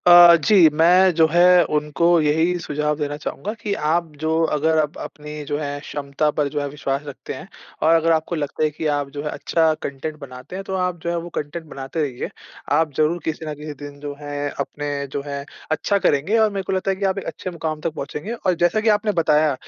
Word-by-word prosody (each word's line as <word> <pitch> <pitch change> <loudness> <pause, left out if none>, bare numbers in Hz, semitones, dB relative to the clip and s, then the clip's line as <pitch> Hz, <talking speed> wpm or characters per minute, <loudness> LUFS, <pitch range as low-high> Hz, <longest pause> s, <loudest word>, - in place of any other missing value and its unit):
अ, 175 -1 +10
जी। 190 -7 +7
मैं 180 +4 +5
जो 160 -1 +5
है 175 +1 +6
उनको 150 +2 -1 0.2
यही 160 +4 +2
सुझाव 150 -1 -1
देना 145 0 -2
चाहूँगा 205 +6 -5
कि, 210 -2 -4
आप 165 0 0
जो 160 0 0 0.2
अगर 160 +2 +2
आप 150 -1 -1
अपनी 150 0 -7
जो 145 0 -2
है 145 -1 -3
क्षमता 145 +1 -2
पर 150 -2 +2
जो 145 +1 -2
है 145 - -2
विश्वास 140 -1 -2
रखते 140 - -7
हैं - - -9 0.4
और 160 +1 +5
अगर 165 0 +3
आपको 160 +1 0
लगता 150 0 -2
है 155 - +3
कि 155 +2 -6
आप 145 -1 -2
जो 145 - -3
है 150 - -2
अच्छा 160 0 +1
कंटेंट 140 +3 -4
बनाते 130 +3 -10
हैं, 195 - -5
तो 190 - -5
आप 180 -1 -1
जो 170 - -1
है 170 - -1
वो 170 +1 -5
कंटेंट 150 +3 -4
बनाते 135 +1 -5
रहिए। 135 -5 -3 0.4
आप 155 0 +2
ज़रूर 155 +3 +2
किसी 160 0 -3
न 155 - -3
किसी 150 +1 -7
दिन 145 0 -9
जो 145 0 -5
है 145 0 -3
अपने 145 +1 -3 0.2
जो 140 - -2
है 140 -1 -4 0.3
अच्छा 200 +6 +1
करेंगे 180 +4 +2
और 220 -1 +4
मेरे 195 -1 -3
को 190 - -3
लगता 190 +1 0
है - - -1
कि 200 - -1
आप 190 0 +1
एक - - -9
अच्छे 185 - -6
मुकाम 160 -3 -4
तक 165 -1 -2
पहुँचेंगे। 150 +10 -5
और 190 -6 0
जैसा 175 +5 +3
की 220 - +2
आपने 210 0 -1
बताया 150 -1 +3
155 Hz, 230 wpm, -22 LUFS, 145-175 Hz, 0.4 s, अ